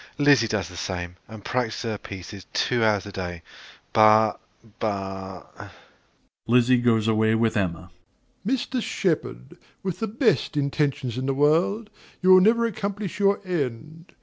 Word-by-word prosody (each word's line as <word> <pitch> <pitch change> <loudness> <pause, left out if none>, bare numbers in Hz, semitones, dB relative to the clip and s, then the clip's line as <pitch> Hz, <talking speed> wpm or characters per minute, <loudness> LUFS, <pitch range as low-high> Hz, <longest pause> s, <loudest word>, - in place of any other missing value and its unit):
Lizzie 140 -5 +4
does 105 -5 -2
the 90 - -11
same, 90 -1 -4
and 110 -1 -11
practises 125 -2 -2
her 105 - -3
pieces 95 0 -9
two 120 -2 +1
hours 105 -3 +2
a 100 - -8
day; 90 -3 -6 0.5
but 110 0 +5 0.4
but 95 -3 -5 0.8
(Lizzie 125 +1 +4
goes 115 -3 +2
away 110 0 +2
with 110 0 +1
Emma.) 90 -3 -2 0.6
DOMINIE. 260 +1 +1
Mr. 255 -2 -3
Shepard, 155 - -2 0.3
with 190 -3 -3
the 225 - -1
best 225 - +1
intentions 140 -3 -1
in 130 - -3
the 135 - 0
world, 170 +10 +2 0.3
you 185 +1 +4
will 185 0 +8
never 230 +4 +4
accomplish 200 -2 -4
your 200 0 +2
end. 155 0 -4
120 Hz, 150 wpm, -24 LUFS, -, 0.8 s, will